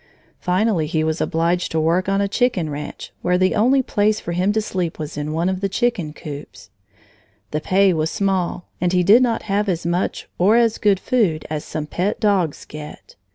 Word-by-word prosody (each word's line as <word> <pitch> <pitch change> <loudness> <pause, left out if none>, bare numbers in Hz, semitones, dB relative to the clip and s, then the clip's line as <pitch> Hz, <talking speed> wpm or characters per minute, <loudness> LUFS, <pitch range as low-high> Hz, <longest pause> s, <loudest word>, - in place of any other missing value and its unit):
Finally 180 -3 +1
he 155 0 0
was 160 +1 -1
obliged 170 +2 0
to 160 - 0
work 170 +4 +1
on 195 0 +2
a 200 - +1
chicken 200 -7 0
ranch, 145 +1 -7
where 180 0 +2
the 185 +1 +2
only 255 +5 +3
place 210 -2 +1
for 175 - -5
him 180 +4 +1
to 220 - +1
sleep 185 -6 -3
was 155 -2 -6
in 150 +1 -3
one 165 +3 0
of 190 0 -1
the 195 - 0
chicken 210 -7 0
coops. 105 - -10 0.8
The 150 - -2
pay 190 +2 +3
was 160 -1 0
small, 185 -3 -1 0.2
and 180 0 +1
he 180 -1 +3
did 210 +7 +6
not 235 -3 +1
have 205 0 0
as 170 -2 -2
much 175 +2 -1
or 200 +5 +5
as 230 -2 +3
good 205 -3 +3
food 190 -10 0
as 150 -1 -2
some 155 -1 -4
pet 180 +6 -2
dogs 195 -8 +1
get. 150 0 -10
180 Hz, 200 wpm, -21 LUFS, 160-205 Hz, 0.8 s, did